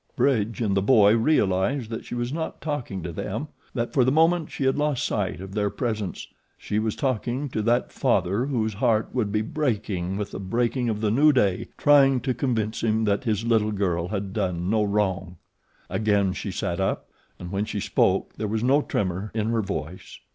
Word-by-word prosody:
Bridge 115 -4 +1
and 100 -4 +1
the 95 - +2
boy 105 -1 +5
realized 115 -1 +1
that 115 - -5
she - - -6
was 120 +2 -2
not 160 0 -4
talking 130 - -4
to 85 - -4
them 110 - -4 0.3
that 120 -2 -2
for 130 - +4
the 130 - +3
moment 165 +2 +3
she - - -4
had 135 0 +2
lost 150 -3 0
sight 100 -5 -1
of 95 +1 -8
their 105 -1 0
presence 110 -3 -3 0.3
she 105 - -2
was 110 -1 -1
talking 130 +1 -1
to 110 - -2
that 120 +3 +1
father 105 -1 +1
whose 110 -6 -1
heart 110 +2 +1
would 110 -5 0
be 105 +1 +1
breaking 105 - -2
with 105 -1 -4
the - - -6
breaking 120 +5 0
of 105 -1 -2
the 105 -2 +1
new 145 +7 +5
day, 105 -9 +1
trying 135 -3 +5
to 130 +1 0
convince 115 -4 -1
him 110 0 +1
that 105 +2 0
his 110 0 0
little 110 -2 +2
girl 90 -4 -1
had 100 -1 -4
done 90 -3 -1
no 110 -1 +3
wrong. 95 -3 -1 0.5
Again 100 -3 +1
she - - -5
sat - - -3
up, - - -2 0.3
and 90 0 -8
when 100 +2 -1
she 105 - -4
spoke - - +1
there 110 - -2
was 110 +2 -1
no 135 +4 +4
tremor 95 -4 -2
in 110 0 0
her 115 -1 +1
voice. 90 -3 -6
110 Hz, 200 wpm, -25 LUFS, 100-125 Hz, 0.5 s, boy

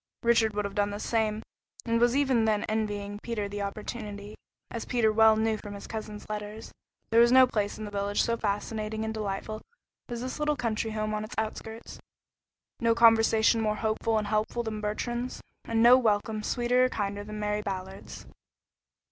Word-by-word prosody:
Richard 230 -2 +3
would 210 0 -1
have 200 - -4
done 205 0 +1
the 205 0 -5
same 220 -1 0 0.4
and 230 0 +1
was 240 +1 +4
even 265 -5 +3
then 215 -1 +1
envying 205 -2 -2
Peter 220 -4 -3
the 205 0 -5
opportunity, 205 0 -6 0.4
as 230 - -4
Peter 235 -3 +2
well 220 0 +6
knew 220 0 +1
from 205 -1 -8
his 200 - -9
cousin's 215 -1 -7
letters. 210 +1 -6 0.4
There 225 - +5
was 235 0 +5
no 260 0 +8
place 210 -5 -2
in 215 - -6
the 205 - -7
village 200 0 0
so 230 - +1
fascinating 215 0 -2
and 220 - -3
delightful 215 0 -4 0.5
as 240 -1 -4
this 255 +4 -5
little 300 0 +1
country 230 -3 -2
home 215 0 -2
on 215 0 -2
its 215 - -8
outskirts, 220 +1 -5 0.8
no 230 -1 +3
conversation 225 0 +5
more 215 -1 +1
hopeful 220 +1 0
and 215 - 0
helpful 215 +3 -1
than 215 -2 -4
Bertrand's, 240 +4 -3 0.3
and 225 0 +1
no 250 +2 +8
welcome 215 -2 0
sweeter 245 +3 +2
or - - +1
kinder 205 -3 -3
than 215 0 -7
Mary 210 0 -1
Ballard's. 190 -1 -6
220 Hz, 180 wpm, -28 LUFS, 210-230 Hz, 0.8 s, no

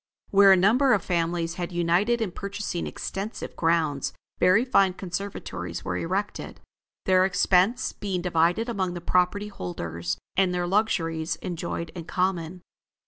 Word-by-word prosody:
Where 195 0 +7
a - - +8
number 245 +9 +4
of 200 -4 0
families 170 -1 0
had 175 - -3
united 175 +7 +1
in 195 - -3
purchasing 200 -1 -4
extensive 200 +3 -5
grounds, 160 -4 0 0.3
very 185 +7 +4
fine 195 -7 +3
conservatories 175 - -5
were 90 - -2
erected, 190 - -3 0.5
their 185 -1 +4
expense 190 +4 +2
being 185 -4 -3
divided 175 +5 +2
among 190 -6 -2
the - - -4
property 180 +4 +1
holders, 85 - -4 0.2
and 185 -2 +2
their 175 0 0
luxuries 170 -5 0
enjoyed 170 -2 -4
in 165 -1 -8
common. 180 -1 -2
180 Hz, 140 wpm, -26 LUFS, 165-200 Hz, 0.5 s, a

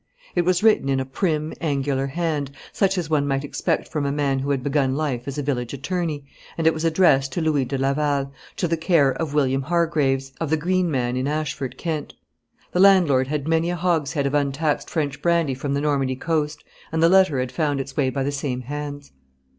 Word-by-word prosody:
It 175 -1 +1
was 185 +2 +2
written 215 -11 +4
in 135 -1 +2
a 130 - -2
prim, 155 +2 -1
angular 140 -3 0
hand, 150 -1 -2 0.2
such 195 -1 +1
as 175 -4 -1
one 145 -2 +1
might 135 0 0
expect 160 +3 -1
from 150 -2 -2
a 140 - 0
man 140 -2 0
who 135 +2 -3
had 135 -3 0
begun 135 -1 +1
life 140 -5 -2
as 140 +1 -4
a 145 - -1
village 125 -3 -2
attorney, 150 0 -3 0.3
and 165 - -1
it 160 - +5
was 160 - -4
addressed 155 -5 +3
to 175 - -1
Louis 150 -4 +1
de 135 +2 -3
Laval, 140 0 0 0.3
to 175 - 0
the 165 0 0
care 160 -4 +3
of 150 +2 -4
William 135 -2 +2
Hargreaves, 140 -4 0
of 160 - -1
the 160 - +2
Green 180 +2 +1
Man 125 -4 -1
in 130 +2 -1
Ashford, 140 -4 -3
Kent. 160 -4 -4 0.6
The 180 - -1
landlord 175 -10 +5
had 150 0 -3
many 165 +1 +2
a 175 - -1
hogshead 160 -4 0
of 140 - -1
untaxed 145 +1 0
French 145 -4 -2
brandy 170 -5 +2
from 140 +2 -3
the 140 - 0
Normandy 140 -3 0
coast, 155 +1 -2 0.3
and 160 0 +1
the - - +7
letter 185 -5 +4
had 125 -1 -2
found 145 +1 0
its 135 0 -6
way 135 -3 +2
by 135 +1 -2
the 140 - -1
same 135 -3 -3
hands. 145 +2 -6
145 Hz, 215 wpm, -23 LUFS, 135-160 Hz, 0.6 s, the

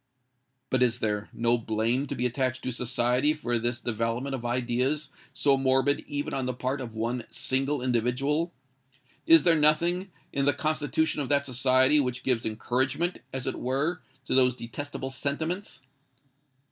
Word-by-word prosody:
But 130 - +2
is 120 -2 +3
there 105 -2 -2
no 120 +1 +1
blame 115 +5 0
to - - -4
be 125 - -1
attached 130 +1 -1
to 130 - -2
society 125 +4 +1
for 120 -6 -1
this 120 +1 -1
development 115 +3 -2
of 130 -3 -4
ideas 125 +4 -1 0.2
so 135 +1 +2
morbid 135 +2 +2
even 145 0 -3
on 130 -2 -2
the 125 - -2
part 130 +2 -2
of 115 -3 -7
one 115 +2 -2
single 135 +1 -1
individual? 130 +7 0 0.8
is 330 -1 +8
there 170 -2 +5
nothing 170 +5 +2 0.2
in 140 -1 0
the 145 - +4
constitution 155 -1 0
of 135 - -4
that 140 -1 +3
society 130 +2 +4
which 130 -2 -1
gives 125 -4 0
encouragement, 130 +10 -1
as 130 -1 -4
it - - -2
were, 145 +7 -1 0.2
to - - -2
those 125 -1 +5
detestable 135 +3 -6
sentiments? 160 +7 -3
130 Hz, 160 wpm, -27 LUFS, 120-145 Hz, 0.8 s, is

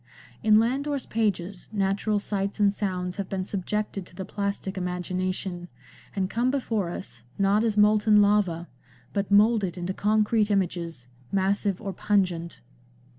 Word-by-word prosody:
In 215 -2 +5
Landor's 270 +4 0
pages 200 -4 -2
natural 200 +1 0
sights 200 0 -2
and 200 -1 +4
sounds 180 -3 -2
have 200 -2 -4
been 190 -1 -2
subjected 200 +1 -3
to - - -18
the 190 - -5
plastic 200 -1 -3
imagination, 180 0 -3 0.5
and 190 -2 0
come 235 +5 0
before 225 -9 -1
us, 170 - -7 0.2
not 200 +2 +3
as 220 -2 0
molten 210 0 +5
lava, 200 -5 +2 0.5
but 200 -2 -1
moulded 205 -3 +4
into 180 +1 -3
concrete 215 +1 +2
images, 170 - -1 0.2
massive 195 0 +1
or 195 -3 -5
pungent. 180 -5 0
200 Hz, 135 wpm, -26 LUFS, 185-210 Hz, 0.5 s, In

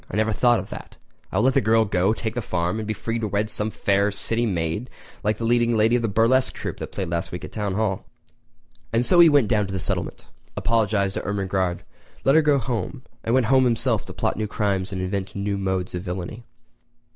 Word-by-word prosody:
I - - -5
never 110 +1 +2
thought 120 +2 +3
of - - -8
that! - - -9 0.3
I - - -1
will 105 - +3
let 130 +1 +4
the - - +3
girl 110 +1 +3
go, 95 0 +1
take 110 0 -3
the 120 - -2
farm, 90 0 -1
and 110 - -5
be 110 - -1
free 115 +2 -3
to 110 - -2
wed 105 +2 -1
some 105 +1 0
fair 100 -1 +1
city 115 +3 -1
maid 90 +5 -2 0.3
like 105 0 +1
the 115 - -3
leading 120 0 +2
lady 110 +3 +4
of 120 - +1
that 115 - 0
burlesque 125 +4 +3
troupe - - -5
which - - -4
played 95 -4 -4
last 85 +1 -2
week 90 - -6
at - - -10
the - - -14
Town 105 -3 -2
Hall!" 105 -3 -1 0.9
And 115 +2 +2
so 175 - +4
he 170 -1 +9
went 145 -7 +4
down 105 -2 +1
to 95 - -6
the 95 - -2
settlement, - - -2 0.3
apologised 105 -4 +1
to - - -3
Ermengarde, 95 -2 -1 0.4
let 135 - +4
her 160 - +6
go 150 -2 +3
home, 125 +2 -3 0.2
and 115 - +1
went 130 -2 +3
home 130 +2 +4
himself 115 -2 +1
to - - -9
plot - - -1
new 110 0 -1
crimes 100 -3 -1
and 95 -1 -3
invent 95 +1 -3
new 100 0 -1
modes 95 -2 -2
of 90 - -3
villainy. 95 +5 -6
105 Hz, 240 wpm, -23 LUFS, 95-115 Hz, 0.9 s, he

